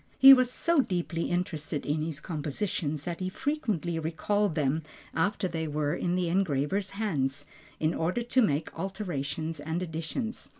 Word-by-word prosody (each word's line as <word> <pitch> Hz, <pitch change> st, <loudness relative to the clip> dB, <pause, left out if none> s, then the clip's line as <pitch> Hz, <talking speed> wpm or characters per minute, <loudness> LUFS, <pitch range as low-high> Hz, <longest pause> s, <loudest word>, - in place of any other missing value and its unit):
He 270 Hz, 0 st, +11 dB
was 255 Hz, -2 st, +4 dB
so 335 Hz, +5 st, +2 dB
deeply 175 Hz, -7 st, 0 dB
interested 160 Hz, -4 st, -2 dB
in 150 Hz, +1 st, 0 dB
his 155 Hz, -2 st, -3 dB
compositions 150 Hz, -1 st, -2 dB
that 170 Hz, 0 st, -4 dB
he 185 Hz, 0 st, -2 dB
frequently 200 Hz, -, -1 dB
recalled 170 Hz, +4 st, 0 dB
them 150 Hz, +2 st, +1 dB, 0.3 s
after 195 Hz, +3 st, +1 dB
they 160 Hz, -2 st, -3 dB
were 150 Hz, 0 st, 0 dB
in 175 Hz, 0 st, 0 dB
the 180 Hz, -1 st, +1 dB
engraver's 185 Hz, +1 st, +1 dB
hands, 145 Hz, -9 st, -1 dB, 0.3 s
in 155 Hz, +1 st, +1 dB
order 180 Hz, +9 st, 0 dB
to 255 Hz, +2 st, +3 dB
make 155 Hz, -7 st, +1 dB
alterations 165 Hz, -5 st, -3 dB
and 160 Hz, +4 st, -2 dB
additions. 165 Hz, +8 st, -4 dB
170 Hz, 155 wpm, -29 LUFS, 155-200 Hz, 0.3 s, He